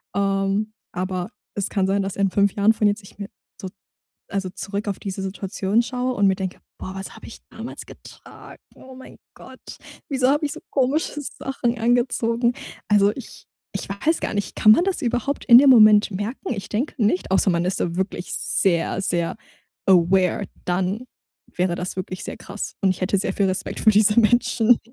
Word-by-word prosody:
ähm, 195 +2 0 0.2
aber 185 +2 -3 0.2
es 200 -1 -1
kann 195 -3 0
sein, 195 +1 +1
dass 195 -1 -4
in 195 -1 +1
5 200 0 +2
Jahren 205 +2 +4
von 210 -1 +1
jetzt 205 +1 0
ich 195 - -16
mir 200 - -5 0.3
so 190 - -5 0.6
also, 195 -2 -3
zurück 200 +3 -5
auf 200 - -3
diese 195 -1 -5
Situation 195 +2 -1
schaue 250 +1 -2
und 200 -1 +3
mir 190 - +3
denke: 190 -2 -5 0.2
„Boah, 190 - -7
was 195 - -7
habe - - -12
ich - - -11
damals - - -8
getragen? - - -14
Oh 260 0 -14
mein 260 - -13 0.2
Gott, - - -14 0.5
wieso 260 -2 +1
habe 295 +2 +2
ich 290 - -2
so - - -7
komische 285 +3 0
Sachen 250 -4 -3
angezogen?“ 235 0 +1 0.4
Also, 205 0 +4
ich 265 - -11 0.3
ich - - -5
weiß 200 +12 0
gar - - -3
nicht, 205 0 -3
kann 215 - +6
man 340 - +5
das 380 -4 -1
überhaupt 245 +4 -2
in 240 -1 +9
dem 280 -1 +6
Moment 215 -4 +7
merken? 205 +7 -4
Ich 195 - -7
denke 240 +8 -2
nicht, 190 -3 +1
außer 190 0 +3
man 170 +1 0
ist 185 - -1
da 170 -1 -2
wirklich 185 -1 -3
sehr, 175 0 0
sehr, 170 -3 -1 0.5
aware, 185 0 +3 0.2
dann 190 +6 -1 0.5
wäre 180 -1 0
das 180 +1 -4
wirklich 185 0 -5
sehr - - -6
krass 200 +1 -7
und 195 - +3
ich 185 - -1
hätte 195 +2 +1
sehr - - -1
viel 200 - +1
Respekt 185 0 -3
für 215 - +5
diese 210 +2 +4
Menschen. 240 0 +3
200 Hz, 190 wpm, -22 LUFS, 190-235 Hz, 0.6 s, in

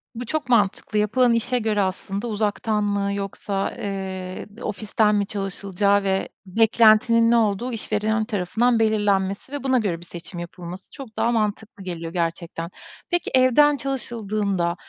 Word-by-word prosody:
Bu 245 +2 -5
çok 295 +1 -3
mantıklı. 210 -2 +2
Yapılan 235 +4 +3
işe 240 +2 +1
göre 215 -2 +1
aslında 195 +3 -3
uzaktan 210 0 0
mı, 200 -1 0
yoksa, 200 0 -3
eee, 190 -2 -5
ofisten 210 0 +1
mi 205 -1 +1
çalışılacağı 200 0 0
ve 195 0 0 0.2
beklentinin 225 +3 +4
ne - - +5
olduğu 225 +2 +1
işverilen 220 0 0
tarafından 225 +3 +1
belirlenmesi 205 -1 +1
ve 285 -1 -5
buna 260 -1 +3
göre 190 -7 -1
bir 170 - -12
seçim 175 +1 -8
yapılması 175 +2 -8
çok 265 -6 -11
daha 235 - +2
mantıklı 215 -2 -2
geliyor 170 -2 -5
gerçekten. 170 -1 -3 0.4
Peki 350 -1 0
evden 270 +3 +5
çalışıldığında, 215 -9 -2
210 Hz, 140 wpm, -23 LUFS, 195-230 Hz, 0.4 s, ne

